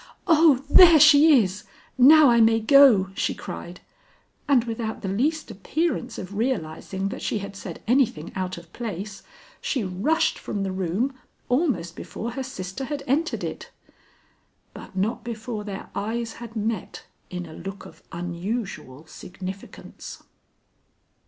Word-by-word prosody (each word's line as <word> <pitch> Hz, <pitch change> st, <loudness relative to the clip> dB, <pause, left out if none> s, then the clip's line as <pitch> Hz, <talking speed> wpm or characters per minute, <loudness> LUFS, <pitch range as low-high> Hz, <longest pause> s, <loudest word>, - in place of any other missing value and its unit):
"Oh, 315 Hz, -6 st, +5 dB
there 335 Hz, +1 st, +8 dB
she 295 Hz, -3 st, +7 dB
is! 190 Hz, +2 st, -5 dB, 0.3 s
Now 285 Hz, +2 st, +7 dB
I 235 Hz, -1 st, +4 dB
may 225 Hz, 0 st, +4 dB
go," 225 Hz, -6 st, +6 dB
she -, -, -1 dB
cried; 175 Hz, +1 st, -8 dB, 0.7 s
and 270 Hz, -5 st, +4 dB
without 225 Hz, -2 st, -5 dB
the -, -, -3 dB
least 285 Hz, +11 st, -1 dB
appearance 260 Hz, -, -2 dB
of 185 Hz, +1 st, -7 dB
realizing 195 Hz, -4 st, -3 dB
that -, -, -7 dB
she -, -, -1 dB
had 200 Hz, 0 st, -7 dB
said 185 Hz, -4 st, -9 dB
anything 235 Hz, -, +1 dB
out 185 Hz, -1 st, -3 dB
of 170 Hz, 0 st, -14 dB
place, 210 Hz, -3 st, -6 dB, 0.4 s
she 260 Hz, -6 st, -1 dB
rushed 225 Hz, -, 0 dB
from 200 Hz, -, -4 dB
the 190 Hz, -, -2 dB
room 190 Hz, +8 st, -1 dB, 0.4 s
almost 250 Hz, -, 0 dB
before 230 Hz, +5 st, -6 dB
her 265 Hz, -, -5 dB
sister 250 Hz, -1 st, -6 dB
had 285 Hz, 0 st, -5 dB
entered 305 Hz, +6 st, -1 dB
it. -, -, -6 dB, 1.0 s
But -, -, -12 dB
not 205 Hz, +4 st, -1 dB
before 225 Hz, -1 st, -5 dB
their 200 Hz, -2 st, -8 dB
eyes 225 Hz, +2 st, -3 dB
had 235 Hz, -1 st, -9 dB
met 215 Hz, -2 st, -4 dB, 0.2 s
in 180 Hz, -1 st, -5 dB
a 160 Hz, -, -11 dB
look 195 Hz, +4 st, -8 dB
of -, -, -14 dB
unusual 175 Hz, -, -5 dB
significance. 190 Hz, +4 st, -10 dB
220 Hz, 140 wpm, -24 LUFS, 190-265 Hz, 1.0 s, there